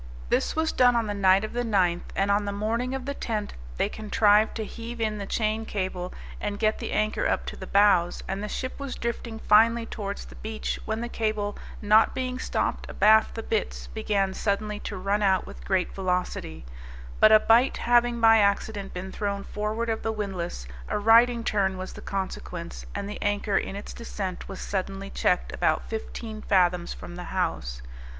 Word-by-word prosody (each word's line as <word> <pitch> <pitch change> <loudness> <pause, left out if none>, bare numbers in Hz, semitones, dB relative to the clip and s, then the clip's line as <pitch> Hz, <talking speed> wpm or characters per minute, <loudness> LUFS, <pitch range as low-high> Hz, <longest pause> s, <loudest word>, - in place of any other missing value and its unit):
This - - +1
was 320 0 +1
done 245 -1 +4
on 230 -1 +2
the 205 - -2
night 195 0 +4
of 215 - -5
the 245 - 0
9th, 185 -7 +2
and 195 +1 +2
on 205 +1 +2
the 200 - -2
morning 230 +5 -1
of 265 -1 -5
the 280 - -2
10th, 215 -6 -3 0.3
they - - +2
contrived 210 0 +3
to 220 - -3
heave 235 +2 -7
in 215 -2 -1
the 200 - -5
chain 220 +1 0
cable, 185 -4 -3 0.3
and 205 -1 -3
get 215 +1 +1
the - - -4
anchor 215 0 +1
up - - 0
to - - -5
the - - -8
bows; 195 -4 +3
and 195 +1 -3
the 210 - -4
ship 255 +5 -4
was 280 -2 -4
drifting 235 -1 -4
finely 230 +2 +4
towards 200 -3 -5
the - - -12
beach, 220 0 -4
when 220 +1 -2
the 240 - -2
cable, 215 -3 -2 0.3
not 215 +2 +5
being 255 -1 -2
stopped - - -2
abaft 220 +1 +4
the 225 - -4
bitts, 60 - -2
began 195 - -1
suddenly 210 +1 -1
to 205 - -5
run 200 +3 0
out 190 -2 +3
with - - -11
great 190 -2 +1
velocity; 180 - -2 0.5
but 215 - +7
a 215 - +9
bight 235 +5 +4
having 240 0 +3
by 225 -1 +7
accident 200 -1 0
been 190 +1 -5
thrown 200 -1 -3
forward 215 +3 -3
of 225 -1 -1
the 225 - -1
windlass, 190 - -4 0.2
a - - 0
riding 230 +3 +5
turn 195 -3 +1
was 185 0 -6
the - - -10
consequence, 180 -3 -5
and 200 0 -3
the 210 - -7
anchor, 205 0 0
in 195 - 0
its 200 - -7
descent, 195 -6 -5
was 195 - -7
suddenly 195 0 -4
checked 180 - 0
about 155 - +1
fifteen 220 0 -6
fathoms 180 -3 +2
from 175 - -8
the 180 - -6
hawse. 60 - -2
210 Hz, 195 wpm, -26 LUFS, 195-225 Hz, 0.5 s, a